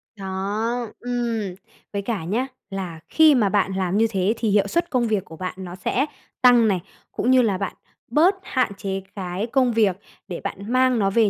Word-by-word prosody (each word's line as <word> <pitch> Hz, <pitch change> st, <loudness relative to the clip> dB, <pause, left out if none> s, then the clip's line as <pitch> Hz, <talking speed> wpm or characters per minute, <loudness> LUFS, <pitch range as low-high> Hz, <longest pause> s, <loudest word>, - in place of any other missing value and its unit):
Đó, 210 Hz, +5 st, -2 dB
ừm, 235 Hz, -6 st, -2 dB, 0.4 s
với 200 Hz, -, -1 dB
cả 205 Hz, -4 st, -3 dB
nhá, 230 Hz, +10 st, -1 dB, 0.2 s
là 185 Hz, -5 st, -5 dB
khi 315 Hz, -3 st, +6 dB
mà 210 Hz, -5 st, +3 dB
bạn 195 Hz, -1 st, +1 dB
làm 190 Hz, +1 st, 0 dB
như 225 Hz, -, +4 dB
thế 195 Hz, +1 st, +1 dB
thì 225 Hz, -, 0 dB
hiệu 200 Hz, 0 st, +3 dB
suất 340 Hz, +10 st, 0 dB
công 245 Hz, -3 st, +1 dB
việc 210 Hz, -3 st, 0 dB
của 160 Hz, -, -11 dB
bạn 185 Hz, 0 st, -4 dB
nó 180 Hz, -2 st, -7 dB
sẽ 240 Hz, +8 st, 0 dB, 0.4 s
tăng 245 Hz, -3 st, +6 dB
này, 190 Hz, -4 st, +1 dB, 0.3 s
cũng 250 Hz, -, +1 dB
như 260 Hz, -1 st, +6 dB
là 210 Hz, -6 st, +1 dB
bạn 195 Hz, 0 st, -3 dB, 0.4 s
bớt 345 Hz, +8 st, +5 dB
hạn 255 Hz, -6 st, 0 dB
chế 195 Hz, -1 st, -3 dB
cái 190 Hz, +2 st, -3 dB
công 255 Hz, -1 st, +2 dB
việc 205 Hz, -5 st, +3 dB, 0.3 s
để 180 Hz, -3 st, -5 dB
bạn 200 Hz, +4 st, -5 dB
mang 255 Hz, -2 st, +4 dB
nó 195 Hz, -1 st, +3 dB
về 220 Hz, +1 st, +3 dB
210 Hz, 200 wpm, -23 LUFS, 190-245 Hz, 0.4 s, khi